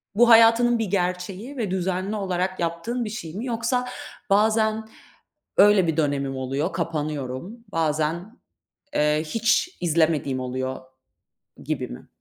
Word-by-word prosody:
bu 240 +3 +5
hayatının 230 +1 +6
bir 225 - 0
gerçeği 190 +6 -3
ve 215 -6 -2
düzenli 190 +2 -1
olarak 185 -2 -2
yaptığın 175 +9 -2
bir - - -4
şey 185 -8 -6
mi? 220 +5 -4
Yoksa, 245 +1 -1 0.4
bazen, 220 +1 +2 0.7
öyle 205 -3 +6
bir 160 -1 -1
dönemim 140 -3 0
oluyor, 135 +6 -2
kapanıyorum. 155 - -4
Bazen, 165 - -1 0.6
eee, 150 +1 +2
hiç 230 - +1
izlemediğim 160 -5 +1
oluyor 130 +1 -3 0.8
gibi - - -2
mi? - - -10
185 Hz, 125 wpm, -24 LUFS, 155-220 Hz, 0.8 s, hayatının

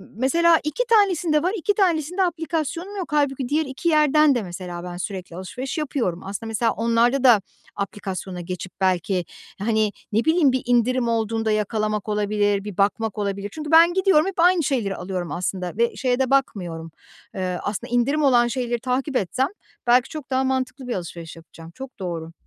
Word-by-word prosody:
mesela, 330 +8 +4
2 305 +11 -1
tanesinde 360 -8 +3
var, 365 +3 +1
2 410 +3 +1
tanesinde 360 -2 +1
aplikasyonum 335 +2 -3
yok. 365 -5 -5
Hâlbuki 270 -4 0
diğer 310 +2 +1
2 275 +5 -2
yerden 305 -2 +4
de, 240 - -1
mesela, 175 -1 -7
ben 175 -1 -6
sürekli 185 -2 -6
alışveriş 250 - -5
yapıyorum. 285 -8 -1
Aslında, 200 +3 -5
mesela, 225 +1 +1
onlarda 235 +3 +2
da 240 -6 +6 0.3
aplikasyona 190 -2 -5
geçip 180 +1 -6
belki, 185 -1 +1 0.3
hani, 215 0 +1 0.2
ne 220 +2 +1
bileyim, 320 -3 +4
bir 260 0 0
indirim 245 0 +2
olduğunda 225 -1 0
yakalamak 215 0 -1
olabilir, 205 -1 +1
bir 205 -3 -7
bakmak 210 +2 0
olabilir. 200 -1 -3
Çünkü 305 -1 -6
ben 335 +2 +7
gidiyorum 380 -5 +4
hep 390 -2 -5
aynı 350 0 +4
şeyleri 235 -9 -1
alıyorum, 180 -1 -4
aslında, 180 0 -3
ve 235 0 +1
şeye 250 -1 0
de 265 -2 +1
bakmıyorum. 175 -12 -1 0.4
Iıı, 185 -1 -2
aslında, 205 +3 -4
indirim 275 +6 +2
olan 245 -4 +5
şeyleri 240 -1 -2
takip 260 +3 -2
etsem 250 +5 +1 0.4
belki 245 +2 +4
çok 305 -4 -8
daha 260 0 +1
mantıklı 260 0 -2
bir 240 - -2
alışveriş 170 -2 -7
yapacağım. 165 0 -13
Çok 265 -2 -10
doğru. 165 -3 -5
240 Hz, 170 wpm, -23 LUFS, 195-295 Hz, 0.4 s, ben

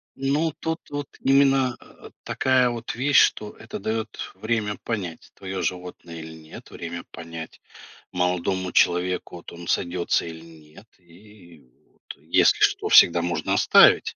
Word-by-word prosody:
Ну, 145 +4 0
тут 160 0 -3
вот 145 -1 -5
именно, 135 -2 +3
э, - - -16
такая 130 -1 +2
вот 115 -1 -5
вещь, 135 +2 +4
что 105 -1 +1
это 110 - -9
дает 110 +1 -4 0.2
время 110 -2 -2
понять, 95 -8 -5
твое 95 -1 -5
животное 90 -2 -5
или 80 0 -9
нет, 80 -1 -13
время 85 0 -7
понять 85 -1 -9 0.5
молодому 90 +1 -1
человеку, 90 0 +1
вот 85 - -12
он 85 0 -10
сойдется 85 -1 0
или 80 -1 -9
нет, 80 +3 -16
и 90 -1 -18 0.3
вот - - -36 0.2
если - - +3
что, - - +2
всегда 85 0 +7
можно 85 0 -2
оставить. - - +5
90 Hz, 140 wpm, -24 LUFS, 85-115 Hz, 0.5 s, всегда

